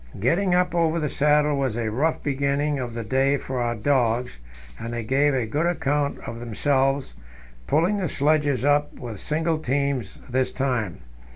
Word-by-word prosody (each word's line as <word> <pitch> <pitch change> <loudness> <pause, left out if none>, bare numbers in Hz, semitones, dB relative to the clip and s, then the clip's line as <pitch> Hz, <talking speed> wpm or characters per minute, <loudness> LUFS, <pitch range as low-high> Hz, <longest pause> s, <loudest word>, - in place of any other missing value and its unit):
Getting 175 - +2
up 180 -1 +2
over 170 -1 +2
the 150 -2 -1
saddle 150 +1 +3
was 130 -5 -1
a 110 -2 -1
rough 150 +8 0
beginning 140 +1 0
of 120 -2 -5
the 115 - -3
day 135 +5 +2
for 130 -1 -4
our 120 0 0
dogs, 120 - 0 0.4
and 115 - -5
they 120 -1 -3
gave 135 +4 +2
a 125 -3 0
good 150 +9 0
account 145 -4 0
of 115 - -6
themselves, 135 - 0 0.5
pulling 175 +7 +2
the 190 -3 -1
sledges 145 -3 +1
up 145 0 +2
with 115 -6 -7
single 160 +1 -1
teams 140 -6 -1
this 130 +1 0
time. 125 -9 -2
140 Hz, 170 wpm, -24 LUFS, 120-150 Hz, 0.5 s, saddle